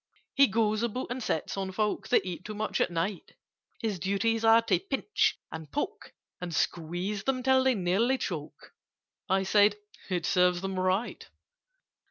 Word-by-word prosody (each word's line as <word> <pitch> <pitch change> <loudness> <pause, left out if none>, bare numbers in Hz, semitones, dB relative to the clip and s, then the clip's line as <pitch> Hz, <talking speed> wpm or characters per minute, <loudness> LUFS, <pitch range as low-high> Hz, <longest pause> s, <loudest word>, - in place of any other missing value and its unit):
"He 275 -1 +6
goes 215 -1 +1
about 235 +2 -3
and 255 +1 -3
sits 160 -8 -2
on 195 -1 -3
folk 205 0 -1
That - - +3
eat 180 -1 -5
too 215 +2 -7
much 215 +1 -1
at - - +2
night: 175 +2 -3 0.5
His 210 -5 -2
duties 200 +5 0
are 225 0 +6
to - - +2
pinch, 415 +6 0
and 160 -1 -8
poke, 290 - -4 0.3
And 175 -3 -4
squeeze 175 +7 -2
them 255 -1 0
till 265 0 +4
they 260 -1 +3
nearly 205 +8 +1
choke." 155 - -6 0.6
(I 190 +1 +2
said 205 +1 +4 0.3
"It 175 -3 -1
serves 180 -1 +3
them 190 -1 -3
right!") 185 +5 -1
205 Hz, 165 wpm, -29 LUFS, 180-230 Hz, 0.6 s, He